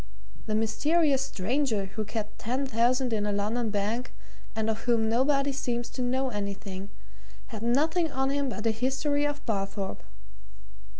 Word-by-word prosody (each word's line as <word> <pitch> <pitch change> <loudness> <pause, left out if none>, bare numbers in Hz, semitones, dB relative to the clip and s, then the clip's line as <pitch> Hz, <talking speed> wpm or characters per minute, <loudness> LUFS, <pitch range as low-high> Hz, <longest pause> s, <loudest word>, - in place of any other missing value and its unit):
The 215 - 0
mysterious 275 +6 +3
stranger 240 -2 0
who 195 +3 -4
kept 215 0 -4
ten 255 +5 -1
thousand 250 +1 +2
in 210 -1 +1
a - - +1
London 215 +3 0
bank, 215 +4 -1 0.4
and 220 0 0
of 220 0 -2
whom 230 -2 +3
nobody 275 +4 +3
seems 240 -3 -2
to 255 - -4
know 260 +2 +1
anything, 200 -2 -4 0.6
had 220 -3 -6
nothing 310 +8 +2
on 265 0 +1
him 280 -1 0
but 230 -2 -5
a 225 - +4
history 270 +5 +1
of 290 0 -5
Barthorpe. 195 -2 -2
235 Hz, 155 wpm, -28 LUFS, 215-270 Hz, 0.6 s, a